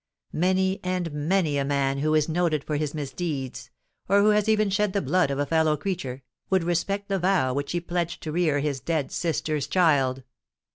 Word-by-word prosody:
Many 190 Hz, +2 st, +1 dB
and 180 Hz, -2 st, -2 dB
many 150 Hz, 0 st, 0 dB
a -, -, +1 dB
man 140 Hz, -1 st, 0 dB
who 155 Hz, +2 st, +1 dB
is 155 Hz, -1 st, +2 dB
noted 160 Hz, -3 st, 0 dB
for 150 Hz, -, -3 dB
his 150 Hz, 0 st, -2 dB
misdeeds—or 150 Hz, +5 st, -3 dB
who 210 Hz, -, +5 dB
has 210 Hz, 0 st, +2 dB
even 215 Hz, -2 st, +2 dB
shed 205 Hz, 0 st, +1 dB
the 200 Hz, -, +1 dB
blood 180 Hz, -5 st, +2 dB
of 140 Hz, -, -2 dB
a 145 Hz, -, 0 dB
fellow 160 Hz, 0 st, +2 dB
creature—would 165 Hz, +1 st, -3 dB
respect 195 Hz, +4 st, -1 dB
the 195 Hz, -1 st, 0 dB
vow 175 Hz, -8 st, +2 dB
which 140 Hz, +1 st, -3 dB
he 175 Hz, -, +1 dB
pledged 175 Hz, 0 st, -3 dB
to 155 Hz, -, -4 dB
rear 155 Hz, -4 st, +1 dB
his 140 Hz, -2 st, -1 dB
dead 155 Hz, -2 st, -2 dB
sister's 155 Hz, -4 st, -1 dB
child. 135 Hz, -7 st, +2 dB
160 Hz, 185 wpm, -25 LUFS, 145-185 Hz, -, who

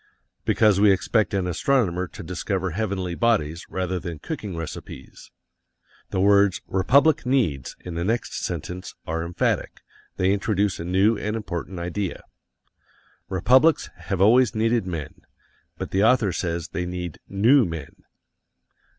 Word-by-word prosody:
Because 105 Hz, -3 st, +3 dB
we 105 Hz, 0 st, +6 dB
expect 105 Hz, +3 st, +1 dB
an 95 Hz, -2 st, 0 dB
astronomer 90 Hz, -, +1 dB
to -, -, -10 dB
discover 90 Hz, +2 st, -2 dB
heavenly 95 Hz, -2 st, -2 dB
bodies 85 Hz, -7 st, 0 dB
rather 95 Hz, -1 st, -2 dB
than 85 Hz, -2 st, -6 dB
cooking 105 Hz, -, -6 dB
recipes. 80 Hz, -4 st, -8 dB, 0.8 s
The -, -, -2 dB
words, 100 Hz, 0 st, +4 dB
"Republic 140 Hz, +11 st, +3 dB
needs" 115 Hz, -, 0 dB
in 90 Hz, -, -7 dB
the 85 Hz, +1 st, -2 dB
next 115 Hz, +5 st, -2 dB
sentence, 90 Hz, +2 st, -5 dB
are 80 Hz, +1 st, -2 dB
emphatic; 85 Hz, +1 st, -1 dB, 0.4 s
they 95 Hz, +1 st, +2 dB
introduce 100 Hz, -2 st, 0 dB
a 85 Hz, -, -5 dB
new 95 Hz, +5 st, +2 dB
and 105 Hz, +1 st, -2 dB
important 95 Hz, -3 st, -5 dB
idea. 90 Hz, +2 st, -4 dB, 1.1 s
Republics 130 Hz, -, +3 dB
have 95 Hz, -3 st, -4 dB
always 120 Hz, +4 st, +5 dB
needed 115 Hz, -2 st, +1 dB
men, 80 Hz, -5 st, -6 dB, 0.6 s
but -, -, -5 dB
the 95 Hz, +1 st, +2 dB
author 115 Hz, -4 st, +4 dB
says 85 Hz, -1 st, -3 dB
they 90 Hz, -2 st, -3 dB
need 90 Hz, -3 st, -5 dB
NEW 120 Hz, +8 st, +5 dB
men. 80 Hz, -5 st, -6 dB
95 Hz, 135 wpm, -24 LUFS, 85-110 Hz, 1.1 s, we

